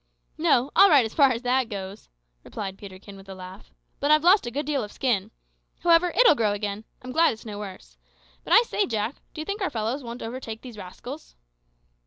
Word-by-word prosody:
"No; 255 +4 +2
all 390 +3 +8
right 280 -6 +6
as 220 - -6
far 275 -3 +5
as 235 0 -3
that 250 -1 +1
goes," 195 -1 -7 0.3
replied 195 -2 -6
Peterkin 195 0 -12
within 195 0 -11
a - - -13
laugh; 185 +2 -11 0.3
"but 285 - 0
I've 305 0 +5
lost 365 - +5
a - - -4
good 290 +5 -3
deal 285 -4 -1
of 210 - -8
skin. 220 -6 -1 0.5
However, 345 0 +4
it'll - - +8
grow 220 -7 +1
again. 205 +1 -4 0.2
I'm 255 - -7
glad 325 +2 +3
it's 220 - -14
no 205 -2 -7
worse. 195 -3 -10 0.4
But - - -1
I 465 - +8
say, 420 -3 -1
Jack, 220 +2 -2 0.2
do 310 - -5
you - - -6
think 405 +4 -4
our 380 - 0
fellows 230 +3 -3
won't 235 0 -7
overtake 225 -1 -7
these 245 -3 -10
rascals?" 210 +9 -10
235 Hz, 215 wpm, -25 LUFS, 205-290 Hz, 0.5 s, all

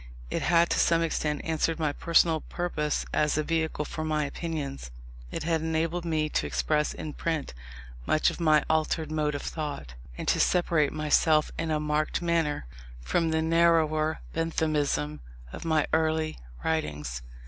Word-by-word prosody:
It - - -1
had 170 0 +3
to - - +2
some 165 0 +3
extent 150 -2 -1
answered 160 0 0
my 155 -3 0
personal 165 -1 +3
purpose 155 -4 -2
as 150 0 +2
a 155 - +1
vehicle 160 -1 -1
for 155 - -5
my 155 -1 0
opinions. 145 - -4 0.4
It - - -4
had 165 -1 +1
enabled 160 +2 -1
me 155 -2 +1
to 75 - -1
express 70 - 0
in 150 - -6
print 160 - -2 0.5
much 155 - +3
of - - -9
my 155 -2 +4
altered 160 0 0
mode 150 -1 0
of 145 - -4
thought, 145 - -5 0.2
and - - -5
to - - +2
separate 165 -5 +2
myself 155 0 +3
in 165 0 -3
a 155 -1 +1
marked 150 0 0
manner 165 - 0 0.3
from 160 - 0
the 160 0 +1
narrower 160 -2 +3
Benthamism 150 - 0 0.3
of - - -7
my 160 -2 +2
early 160 0 +1 0.3
writings. 75 - -2
155 Hz, 160 wpm, -28 LUFS, 150-165 Hz, 0.5 s, my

